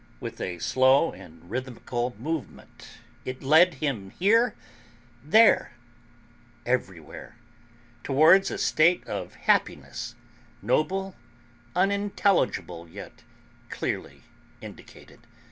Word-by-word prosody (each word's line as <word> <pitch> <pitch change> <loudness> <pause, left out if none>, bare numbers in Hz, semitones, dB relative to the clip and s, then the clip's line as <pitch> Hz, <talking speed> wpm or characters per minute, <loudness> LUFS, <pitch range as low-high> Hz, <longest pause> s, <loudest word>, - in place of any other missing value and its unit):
With 115 - -7
a 90 -1 -4
slow 130 - +3
and 85 -2 -15
rhythmical 125 +1 -4
movement 145 -1 -7 0.4
it 130 +1 -7
led 160 +5 +5
him 130 -9 -3
here, 225 - +2 0.7
there, 215 - +4 0.9
everywhere, 105 -5 -4 0.7
towards 160 +8 +5
a - - -4
state 170 +3 +2
of - - -6
happiness 120 0 -1 0.4
noble, 190 - -1 0.6
unintelligible, 195 - 0
yet - - -11 0.5
clearly - - -5 0.4
indicated. - - -14
135 Hz, 85 wpm, -26 LUFS, 115-180 Hz, 0.9 s, led